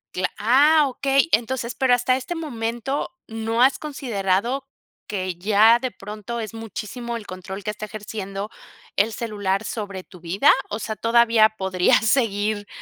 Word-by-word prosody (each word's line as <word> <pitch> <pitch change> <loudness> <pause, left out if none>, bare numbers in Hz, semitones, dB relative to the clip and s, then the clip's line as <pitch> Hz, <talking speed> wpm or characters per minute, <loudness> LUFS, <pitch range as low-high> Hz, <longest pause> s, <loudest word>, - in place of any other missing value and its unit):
Cla 180 0 0
ah, 285 +6 +5
okey, 275 +4 +1
entonces, 240 +1 0
pero 260 -2 +2
hasta 245 +1 +3
este 265 +7 -5
momento, 260 0 -3
¿no 225 +1 -2
has 265 +2 +5
considerado 245 -3 -1 0.4
que 185 -3 -3
ya 215 +5 +5
de 255 0 -3
pronto 210 +3 -6
es 215 -1 -6
muchísimo 225 +2 -6
el 225 -3 -6
control 185 +2 -7
que - - -3
está 210 0 -7
ejerciendo 205 -1 -6 0.5
el 215 +3 +2
celular 205 -3 -2
sobre 200 -5 -5
tu 180 - -15
vida? 180 - +4 0.2
O 210 - -3
sea, 220 -1 -4
¿todavía 230 -1 +5
podrías 190 +2 +2
seguir 210 -4 +1
225 Hz, 150 wpm, -23 LUFS, 200-245 Hz, 0.5 s, ah